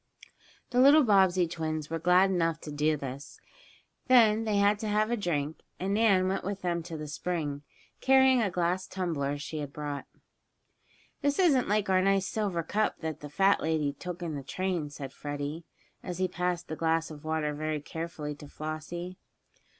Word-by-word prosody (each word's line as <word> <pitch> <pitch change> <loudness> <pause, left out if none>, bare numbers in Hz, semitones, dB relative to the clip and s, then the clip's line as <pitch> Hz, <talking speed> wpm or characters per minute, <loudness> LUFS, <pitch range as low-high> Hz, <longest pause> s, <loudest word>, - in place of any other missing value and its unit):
The 245 - +2
littler 285 +3 +7
Bobbsey 190 -5 +4
twins 155 -2 -4
were 165 - -1
glad 180 +3 +4
enough 165 -3 +1
to 150 - -7
do 150 +1 +1
this. 135 0 -8 0.7
Then 225 -3 +5
they 210 -2 +1
had 205 +1 +3
to 220 - -3
have 215 +2 +1
a - - +2
drink, 160 -7 -2 0.2
and 195 +2 -1
Nan 200 -4 +4
went 190 - -1
with 195 0 -4
them 170 -1 0
to 165 -1 -7
the 150 0 -6
spring, 150 -2 -3 0.4
carrying 265 -1 +5
a 210 - +1
glass 180 +1 -1
tumbler 150 -7 -2
she 150 +2 -5
had 145 -2 -5
brought. 145 -1 -5 1.2
"This 285 -1 +1
isn't 295 - +3
like 210 0 +1
our 185 -1 +3
nice 195 0 +2
silver 195 -7 -1
cup 215 +6 -1
that 160 -2 -4
the 145 - -8
fat 195 +6 +3
lady 155 -3 0
took 180 +3 -7
in 165 -2 -3
the 140 - -4
train," 175 +2 -2
said 140 -2 -8
Freddie, 145 +3 -5 0.4
as 180 -2 -5
he 185 0 +1
passed 180 -1 -2
the 160 - -4
glass 165 0 0
of 150 -1 -10
water 155 -1 -1
very 155 +1 -2
carefully 155 0 -5
to 145 - -11
Flossie. 155 +5 -6
170 Hz, 180 wpm, -29 LUFS, 155-195 Hz, 1.2 s, littler